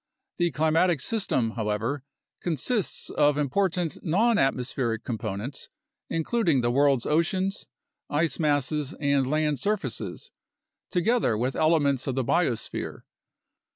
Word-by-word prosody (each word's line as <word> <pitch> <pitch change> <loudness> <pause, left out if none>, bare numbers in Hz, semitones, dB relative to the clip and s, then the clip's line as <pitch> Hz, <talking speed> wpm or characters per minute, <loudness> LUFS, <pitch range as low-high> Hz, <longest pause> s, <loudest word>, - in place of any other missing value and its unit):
The 175 0 +3
climatic 160 +1 +2
system, 130 - 0
how 110 -2 -3
ever, 115 +7 -2 0.4
consists 175 - -1
of 145 -1 +3
important 175 +3 0
nonatmospheric 135 - +1
components, 110 +2 -5 0.4
including 165 - +1
the 120 0 +1
world's 135 -1 +3
oceans, 185 +6 0 0.4
ice 150 -1 0
masses, 150 -1 0
and 140 -3 +2
land 150 -2 +1
surfaces, 210 - -3 0.6
together 185 - +2
with 125 +4 -1
elements 145 -5 +2
of 130 - -1
the 130 -2 0
biosphere. 145 -10 -1
150 Hz, 110 wpm, -26 LUFS, 130-170 Hz, 0.6 s, The